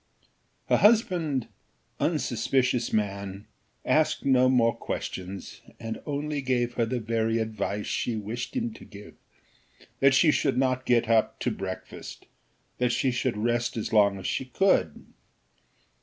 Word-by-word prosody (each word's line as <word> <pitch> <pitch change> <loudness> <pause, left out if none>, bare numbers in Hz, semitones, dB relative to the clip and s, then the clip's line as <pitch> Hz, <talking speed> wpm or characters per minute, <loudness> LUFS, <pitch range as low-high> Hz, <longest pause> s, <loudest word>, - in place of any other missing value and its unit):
Her - - +4
husband, 175 - +3 0.5
unsuspicious 125 -3 0
man, 100 -1 -2 0.4
asked 155 -2 +2
no 130 -2 +4
more 115 -3 +3
questions, 95 +1 -6 0.2
and 115 0 -5
only 145 0 -2
gave 125 -2 0
her 115 -2 0
the 125 +2 -2
very 115 0 0
advice 105 -2 -2
she 120 - -1
wished 110 - -5
him 235 -3 -1
to - - -13
give, 105 0 -12 0.9
that 135 -1 +5
she 155 +2 +5
should - - +1
not 130 -1 0
get 120 -1 +3
up 115 -1 +2
to - - 0
breakfast - - -7 0.5
that 125 -1 +2
she 130 +1 +1
should 125 -2 -1
rest 120 +2 0
as 110 - -3
long 100 -2 +4
as 95 - -9
she 130 - -1
could. 130 - +1
120 Hz, 140 wpm, -27 LUFS, 110-130 Hz, 0.9 s, that